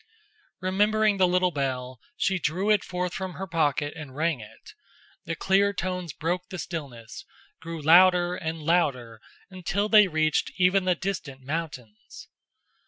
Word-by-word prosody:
Remembering 210 +2 +2
the 185 -1 +4
little 180 0 +2
bell, 130 -3 -3 0.2
she 190 -1 0
drew 180 +7 0
it 210 -2 +3
forth 180 -1 -3
from 190 -1 -5
her 195 - -5
pocket 150 -4 0
and 145 -5 -9
rang 160 -2 0
it. 105 - -14 0.5
The 165 - -3
clear 200 +3 +2
tones 180 -2 -3
broke 175 +5 -3
the 185 - -6
stillness, 135 -11 -7 0.4
grew 165 0 -6
louder 175 +2 +5
and 160 -3 -5
louder 130 -9 0 0.3
until 190 +3 -2
they 210 -2 +7
reached 155 -2 0
even 185 +1 +3
the 180 -1 +2
distant 155 -8 -5
mountains. 135 -8 -7
175 Hz, 145 wpm, -26 LUFS, 150-185 Hz, 0.5 s, they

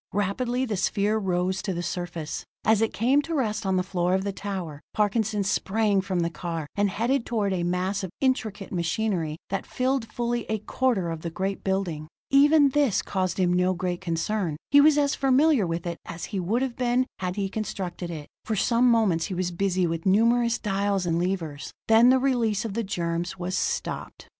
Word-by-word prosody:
Rapidly 240 +6 0
the 215 -5 -2
sphere 205 +3 +1
rose 185 -1 0
to 190 -3 -3
the 175 - -3
surface. 170 -3 -4 0.2
As 220 -1 +4
it 225 - +1
came 260 +6 +3
to 325 +3 -4
rest 220 -6 -1
on 190 - +2
the 185 - +2
floor 180 -1 0
of 190 - 0
the 200 - -2
tower, 185 -8 -5
Parkinson 210 0 +1
sprang 205 0 +1
from 185 -2 -1
the 170 - 0
car, 165 -2 -4
and 205 0 +2
headed 235 +6 0
toward 210 -5 -1
a 180 - -1
mass 180 +3 -1
of 190 - -3
intricate 220 -7 -1
machinery 170 -2 -1
that 195 - -1
filled 255 -3 -1
fully 240 -1 -2
a 220 - +1
quarter 215 -4 0
of 165 -1 -5
the 170 - -3
great 190 +3 -3
building. 185 -6 -2 0.2
Even 290 +1 +6
this 275 -6 +2
caused 185 -2 -1
him 180 -1 +3
no 180 +1 +2
great 180 0 -3
concern; 170 -1 -1
he 285 - +8
was 300 0 +5
as 285 -1 +2
familiar 270 - +3
with 165 +1 -3
it 170 -1 -4
as 170 0 -6
he 195 - 0
would 215 +8 0
have 255 -3 -3
been 250 0 +1
had 180 -1 -2
he 200 -1 -1
constructed 190 -4 -4
it. 155 -3 -6 0.2
For 220 - -2
some 240 +4 +3
moments 210 -8 +3
he 185 - -4
was 180 0 -1
busy 185 0 0
with 165 +1 -2
numerous 235 +4 +3
dials 200 -2 0
and 170 0 +1
levers; 165 -6 -3 0.2
then 225 +2 +6
the 260 - +6
release 235 -6 +1
of 215 - -4
the 230 +2 -1
germs 175 -1 -2
was 180 +1 -3
stopped. - - -3
195 Hz, 200 wpm, -26 LUFS, 180-230 Hz, 0.2 s, he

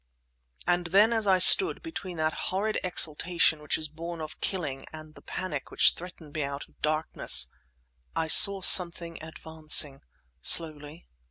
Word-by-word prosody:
And 175 0 -2
then 205 +6 +2
as 220 -2 -1
I 190 -1 +3
stood, 380 - +5
between 195 - -9
that 155 0 -2 0.2
horrid 210 +3 -3
exultation 170 -2 0
which 150 - -3
is 155 - -1
born 165 +2 -10
of 155 -1 -10
killing 145 -8 -4
and 155 -1 -13
the - - -18
panic 160 -7 -7
which - - +3
threatened 170 -4 -14
me 155 - -4
out 140 0 -6
of - - -30
the - - -40
darkness, 150 - +1 0.6
I 160 - -3
saw 195 +4 +5
something 170 -3 +3
advancing... 155 -3 -2 0.4
slowly 155 0 0
160 Hz, 155 wpm, -25 LUFS, 155-180 Hz, 0.6 s, stood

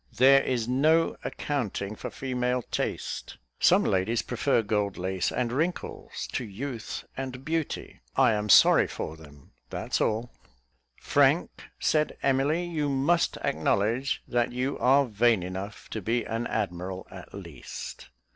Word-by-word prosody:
There 135 +2 +7
is 120 -4 -1
no 155 +6 +3
accounting 110 -7 -3
for - - -6
female 125 -1 -1
taste; - - -3 0.2
some - - +5
ladies 100 +5 +1
prefer 125 -1 +1
gold 105 -2 -1
lace 95 0 -1
and 120 -2 -1
wrinkles, 160 +8 -3
to - - -2
youth 115 +2 -6
and 130 0 -6
beauty 160 -1 -3
I 130 -3 +5
am 105 0 -2
sorry - - +7
for 80 - -5
them, 75 -3 -16 0.2
that's - - -2
all." 115 +3 0 0.7
"Frank," - - +2
said 155 -1 +1
Emily, 140 +6 +2
"you 155 -4 -1
must 140 +6 +2
acknowledge 105 - 0
that 120 -1 +1
you 130 +3 -1
are 140 +2 +5
vain 115 -3 +2
enough 95 +3 -6
to 110 - -3
be 115 +5 0
an 115 +1 -3
admiral 95 -2 -3
at 95 -2 -11
least." 85 -10 -8
120 Hz, 135 wpm, -27 LUFS, 100-135 Hz, 0.7 s, There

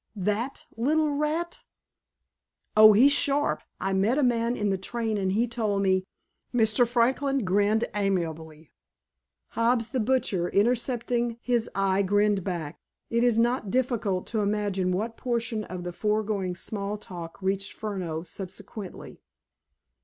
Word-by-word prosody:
That 210 +6 -2
little 300 +6 +2
rat!" 305 +4 -2 1.1
"Oh, 215 0 +9
he's 255 +7 +6
sharp. 285 0 +2 0.2
I 195 0 -1
met 200 +7 +2
a 295 - +2
man 240 -1 +1
in 205 -1 0
the 195 - 0
train 225 +2 -2
and 190 -2 0
he 230 +4 +2
told 215 -4 -1
me—" 190 -1 +1 0.4
Mr. 230 0 +3
Franklin 260 +2 +1
grinned 205 +4 +2
amiably; 165 -6 -2 0.8
Hobbs, 230 0 +1
the 255 - -1
butcher, 215 -7 +1
intercepting 240 +1 0
his 240 -2 0
eye, 195 0 +2
grinned 205 0 +2
back. 170 -6 -4 0.3
It 235 +1 +2
is 240 -2 +3
not 235 -2 +1
difficult 230 -6 0
to 220 - +1
imagine 200 -3 0
what 220 +5 -2
portion 230 -3 -2
of 180 -1 -6
the 175 0 -5
foregoing 210 -3 -1
small 205 +2 -4
talk 175 -5 -9
reached 195 +1 -1
Furneaux 180 -7 -4
subsequently. 190 +3 -8
215 Hz, 135 wpm, -27 LUFS, 190-240 Hz, 1.1 s, Oh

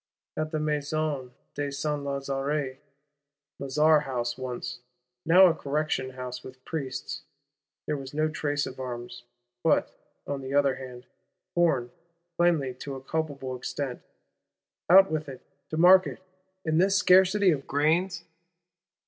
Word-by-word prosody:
At 155 0 -2
the 155 -1 -2
Maison 150 -3 -2 0.2
de 145 -1 -3
Saint 145 +1 -2
Lazare, 140 0 -2 0.8
Lazar 150 +3 +4
House 120 -4 -3
once, 125 -1 -5 0.5
now 180 +3 +8
a 175 - +5
Correction 145 -3 -2
House 125 -1 -6
with 130 0 -12
Priests, 135 -5 -4 0.6
there 150 - -1
was 135 -1 -8
no 155 +1 +1
trace 145 -2 -1
of 130 - -8
arms; 120 -1 -6 0.4
but, - - +2 0.3
on 140 -1 -4
the 135 +1 -4
other 140 -2 +3
hand, 125 -1 -9 0.5
corn, 160 -9 +2 0.4
plainly 165 -7 +2
to 135 +2 -7
a 130 - -9
culpable 140 -4 -3
extent. 130 +1 -4 0.9
Out 190 +1 +8
with 155 -2 -2
it, 130 - -10 0.3
to 155 - -4
market; 185 +2 +6 0.5
in 160 0 +2
this 195 +2 +4
scarcity 190 0 +5
of 140 -4 -3
grains! 165 +4 +1
145 Hz, 130 wpm, -27 LUFS, 130-155 Hz, 0.9 s, now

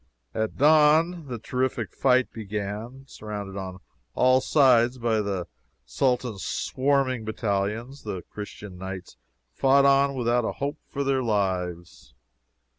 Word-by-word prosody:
At 110 0 -2
dawn 155 +3 +4
the 125 -2 -4
terrific 120 -3 -2
fight 130 -1 +2
began. 105 +4 -5
Surrounded 105 -6 -7
on 95 -2 -6 0.4
all 130 +1 +4
sides 125 -4 +4
by 115 -3 +1
the 100 -4 -3 0.4
Sultan's 120 - -1
swarming 130 -3 0
battalions, 110 +4 -2
the 95 -5 -5
Christian 105 -2 -9
Knights 95 -1 -7 0.4
fought 140 +1 +4
on 140 0 +4
without 120 -1 +1
a - - -2
hope 145 +2 -4
for 140 - -3
their 135 -1 +1
lives. 90 - -2
120 Hz, 120 wpm, -26 LUFS, 100-135 Hz, 0.4 s, dawn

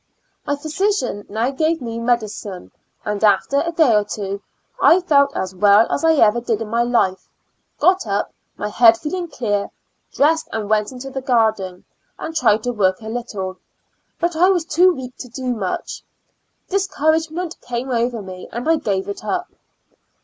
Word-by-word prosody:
My 285 - +1
physician 310 - -1
now 225 +5 -1
gave 315 +4 0
me 230 -3 -5
medicine, 215 -5 -2 0.3
and 210 0 -2
after 215 +7 +3
a 335 - -2
day 315 -8 +4
or 210 -1 +4
two 200 -1 -5 0.4
I 350 - +6
felt 280 -5 +3
as 185 0 -3
well 205 +3 +5
as - - -1
I 325 0 +5
ever 230 -3 +4
did 230 -3 -1
in 225 -2 -5
my 230 +2 +1
life; 235 -6 0 0.5
got 370 -8 +3
up, 200 0 -1 0.2
my 210 - -3
head 225 +1 +6
feeling 345 +5 -4
clear; 205 -9 -2 0.4
dressed 320 +3 +2
and 215 -1 -3
went 210 +1 +2
into 260 +1 -8
the 265 0 -4
garden, 220 -8 0 0.3
and 320 - -6
tried 220 -7 +3
to 245 - -1
work 190 -4 +1
a 220 - -7
little, 205 -6 -5 0.6
but 345 0 0
I 360 +4 +4
was 355 -4 +1
too 360 +2 +4
weak 260 -5 -7
to 250 - -8
do 250 +1 -3
much; 195 -6 -4 0.7
discouragement 325 -3 -1
came 245 +2 -4
over 235 -2 -1
me 185 -1 -9
and 240 +5 -5
I 325 0 +4
gave 195 -7 -2
it 200 - -6
up. 360 - -3
240 Hz, 170 wpm, -20 LUFS, 210-310 Hz, 0.7 s, I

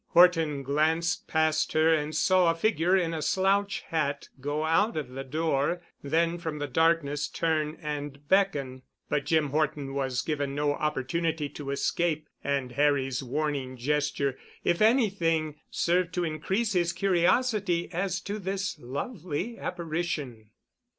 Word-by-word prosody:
Horton 165 -5 +5
glanced 160 +5 +1
past 155 -1 +1
her 160 +1 +4
and 155 -1 -1
saw 180 +2 +4
a 165 - +2
figure 180 -1 +2
in 170 -3 0
a 160 - -3
slouch 195 +4 +1
hat 145 -3 -2
go 145 +3 -2
out 190 +6 +2
of 145 -5 -3
the 135 +1 -6
door, 155 +3 0 0.2
then 165 +4 +1
from 160 -3 -4
the 145 - -2
darkness 150 0 +1
turn 155 -2 -1
and 145 -2 -5
beckon. 145 -9 +1 0.3
But 145 -2 -1
Jim 155 -4 +2
Horton 150 -2 -1
was 130 -2 -1
given 145 -3 -2
no 145 0 +1
opportunity 150 +2 -1
to 145 0 -7
escape 155 +2 0 0.2
and 140 -3 -1
Harry's 135 -1 +1
warning 135 -1 -2
gesture, 140 0 0 0.2
if 175 - +1
anything, 175 - +2
served 175 0 +1
to 180 - 0
increase 190 +7 -1
his 175 -2 +1
curiosity 195 -1 +2
as 180 0 -1
to 205 +1 -4
this 195 +1 -3
lovely 170 - -4
apparition. 155 -10 -4
155 Hz, 140 wpm, -28 LUFS, 145-175 Hz, 0.3 s, Horton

